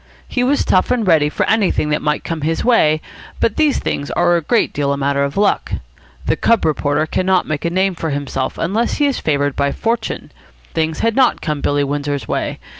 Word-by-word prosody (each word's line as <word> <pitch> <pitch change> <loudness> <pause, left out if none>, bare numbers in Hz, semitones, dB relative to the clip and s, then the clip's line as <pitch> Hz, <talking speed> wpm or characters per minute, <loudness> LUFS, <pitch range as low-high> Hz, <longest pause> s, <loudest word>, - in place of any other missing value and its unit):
He 250 - -1
was 280 +3 +1
tough 185 - +2
and 250 -3 +1
ready 160 -5 +4
for - - -1
anything 200 -8 +1
that 150 - 0
might 150 0 -1
come 165 -2 -4
his 160 +2 -1
way, 155 -11 +3 0.4
but 225 - +1
these 305 -2 +2
things 145 - -3
are 175 0 +2
a 170 - +1
great 230 +9 +1
deal 140 -1 0
a 140 - 0
matter 140 0 0
of 140 +4 -3
luck. 205 0 +1 0.5
The - - +1
cub 230 -2 +2
reporter 150 0 +1
cannot 185 +3 +1
make 155 +1 -3
a - - +2
name 190 +2 +1
for 165 -2 -4
himself 140 -2 -3
unless 215 +8 0
he 295 - +2
is 280 -2 0
favoured 145 -2 0
by 140 0 +1
fortune. 230 +7 -3 0.4
Things 160 -1 -1
had 230 -1 +1
not 260 -2 +3
come 150 -3 -3
Billy 145 0 +1
Windsor's 140 -3 -3
way. - - -2
160 Hz, 210 wpm, -18 LUFS, 145-210 Hz, 0.5 s, ready